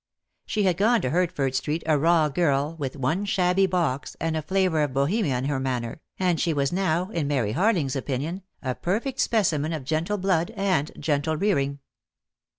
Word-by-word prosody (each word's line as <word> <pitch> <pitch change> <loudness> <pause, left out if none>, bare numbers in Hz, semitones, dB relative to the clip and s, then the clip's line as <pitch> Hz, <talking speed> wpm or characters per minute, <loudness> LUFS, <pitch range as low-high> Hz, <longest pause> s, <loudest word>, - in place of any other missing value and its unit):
She 210 - 0
had 185 -3 +2
gone 225 +4 +4
to 130 - -1
Hertford 165 -6 0
Street 150 +5 -1
a 155 -1 +3
raw 160 +1 +3
girl 145 0 +1
— - - -20
with 135 -2 -3
one 150 +8 0
shabby 190 -1 +2
box, 165 -8 -1
and 165 -1 -1
a 155 - -1
flavour 180 0 +1
of 145 -3 -1
Bohemia 140 - +1
in 125 - -3
her 140 -1 0
manner, 125 +1 -3 0.2
and 180 -4 +1
she 165 -3 +1
was 140 +2 0
now, 180 0 0
in 165 -7 -1
Mary 125 -8 0
Harling's 170 - +1
opinion, 145 +7 -3 0.2
a 130 -2 -1
perfect 225 - -2
specimen 165 -8 +1
of 155 -4 -4
gentle 160 +9 -1
blood 180 -3 +1
and 185 -7 +1
gentle 150 +1 0
rearing. 140 -7 0
160 Hz, 185 wpm, -25 LUFS, 140-185 Hz, 0.2 s, gone